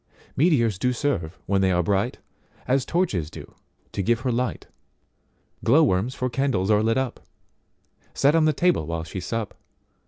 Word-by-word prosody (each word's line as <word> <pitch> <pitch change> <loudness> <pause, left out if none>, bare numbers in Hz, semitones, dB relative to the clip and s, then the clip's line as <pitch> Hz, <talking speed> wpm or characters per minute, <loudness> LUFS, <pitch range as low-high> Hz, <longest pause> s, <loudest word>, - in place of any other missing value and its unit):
Meteors 120 - +2
do 125 +3 +1
serve, 105 - -2
when 100 0 +1
they 95 -1 +3
are 90 -1 +2
bright, 100 +6 0 0.5
As 130 0 +2
torches 105 - 0
do, - - -11 0.4
to - - -2
give 115 +4 +1
her 125 - 0
light, 125 +2 -2 1.0
Glow 145 +8 +5
worms 120 0 +1
for 130 - -1
candles 120 -6 0
are 105 0 +4
lit 115 +2 +1
up, 130 -3 -2 1.0
Set 140 +2 +4
on 165 -1 +4
the 155 - +4
table 170 - +1
while 85 0 -3
she 90 +3 -6
sup. 110 +3 -4
115 Hz, 165 wpm, -24 LUFS, 95-135 Hz, 1.0 s, Glow